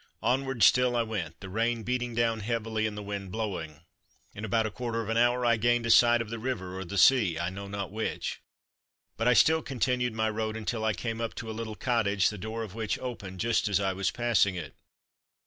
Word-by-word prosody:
Onward 130 Hz, -2 st, +1 dB
still 125 Hz, +2 st, +5 dB
I 120 Hz, -, +2 dB
went, 100 Hz, -8 st, -5 dB
the 95 Hz, -, -7 dB
rain 115 Hz, +4 st, -1 dB
beating 120 Hz, 0 st, -2 dB
down 115 Hz, -1 st, +1 dB
heavily 110 Hz, 0 st, -1 dB
and 105 Hz, -1 st, -6 dB
the 105 Hz, -, -5 dB
wind 100 Hz, -2 st, -5 dB
blowing. 90 Hz, -8 st, -4 dB, 0.5 s
In 100 Hz, -, -8 dB
about 110 Hz, +1 st, +1 dB
a 110 Hz, -, -2 dB
quarter 115 Hz, 0 st, -3 dB
of 110 Hz, -, -7 dB
an 115 Hz, -, 0 dB
hour 120 Hz, +1 st, +3 dB
I 115 Hz, -1 st, +4 dB
gained 120 Hz, +1 st, +2 dB
a 115 Hz, -, +2 dB
sight 120 Hz, 0 st, +6 dB
of 110 Hz, -, -12 dB
the 115 Hz, -, -4 dB
river 110 Hz, -7 st, -4 dB
or -, -, -4 dB
the 95 Hz, +2 st, -5 dB
sea, 110 Hz, -7 st, +5 dB
I 85 Hz, +1 st, -2 dB
know 100 Hz, +1 st, -7 dB
not 100 Hz, -2 st, -5 dB
which, 110 Hz, +1 st, -3 dB, 0.7 s
but 115 Hz, -, -1 dB
I 125 Hz, -, +6 dB
still 160 Hz, +10 st, +5 dB
continued 125 Hz, -3 st, -1 dB
my 110 Hz, 0 st, +1 dB
road 110 Hz, 0 st, -3 dB
until 110 Hz, 0 st, -3 dB
I 110 Hz, -1 st, +2 dB
came 115 Hz, +1 st, -4 dB
up 115 Hz, -, -3 dB
to 110 Hz, -1 st, -5 dB
a -, -, -5 dB
little 110 Hz, -1 st, -5 dB
cottage, 105 Hz, -4 st, +1 dB
the 105 Hz, -, -8 dB
door 110 Hz, +3 st, -4 dB
of 105 Hz, -4 st, -8 dB
which 110 Hz, -1 st, -2 dB
opened 100 Hz, -7 st, -6 dB
just 115 Hz, -1 st, +1 dB
as 100 Hz, -1 st, +2 dB
I 95 Hz, -1 st, 0 dB
was 95 Hz, 0 st, 0 dB
passing 115 Hz, -6 st, +2 dB
it. 90 Hz, -, -6 dB
110 Hz, 230 wpm, -28 LUFS, 100-120 Hz, 0.7 s, sight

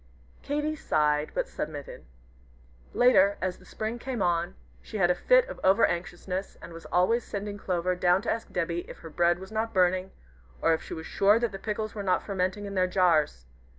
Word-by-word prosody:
Katy 295 Hz, +2 st, -2 dB
sighed, 150 Hz, -, +1 dB
but -, -, 0 dB
submitted. 150 Hz, -2 st, -6 dB, 0.9 s
Later, 200 Hz, -5 st, +4 dB
as 185 Hz, -1 st, -3 dB
the -, -, -18 dB
Spring 220 Hz, +2 st, -4 dB
came 255 Hz, -1 st, -4 dB
on, 175 Hz, -1 st, 0 dB, 0.3 s
she 220 Hz, -, -7 dB
had 180 Hz, -3 st, +4 dB
a -, -, +4 dB
fit -, -, +4 dB
of -, -, -8 dB
over 195 Hz, +4 st, +5 dB
anxiousness, 180 Hz, +2 st, -4 dB
and 170 Hz, -, -10 dB
was 165 Hz, -, -10 dB
always 185 Hz, +7 st, +2 dB
sending 205 Hz, 0 st, -5 dB
Clover 180 Hz, -1 st, -1 dB
down 180 Hz, +1 st, +2 dB
to -, -, 0 dB
ask 225 Hz, -, -4 dB
Debby 170 Hz, -1 st, -1 dB
if -, -, -11 dB
her 165 Hz, -, -10 dB
bread 175 Hz, +2 st, +2 dB
was 190 Hz, +2 st, -11 dB
not 220 Hz, 0 st, -2 dB
burning, 185 Hz, +1 st, +2 dB, 0.5 s
or 165 Hz, -, +3 dB
if 160 Hz, -, -1 dB
she -, -, -7 dB
was 160 Hz, 0 st, -7 dB
sure 205 Hz, +2 st, +3 dB
that 235 Hz, -2 st, -1 dB
the 195 Hz, -, -7 dB
pickles 215 Hz, +1 st, -3 dB
were 210 Hz, -, -5 dB
not 185 Hz, -2 st, +1 dB
fermenting 190 Hz, +1 st, -2 dB
in 200 Hz, -, -6 dB
their 185 Hz, -1 st, +2 dB
jars? 160 Hz, -, +2 dB
185 Hz, 200 wpm, -28 LUFS, 175-215 Hz, 0.9 s, over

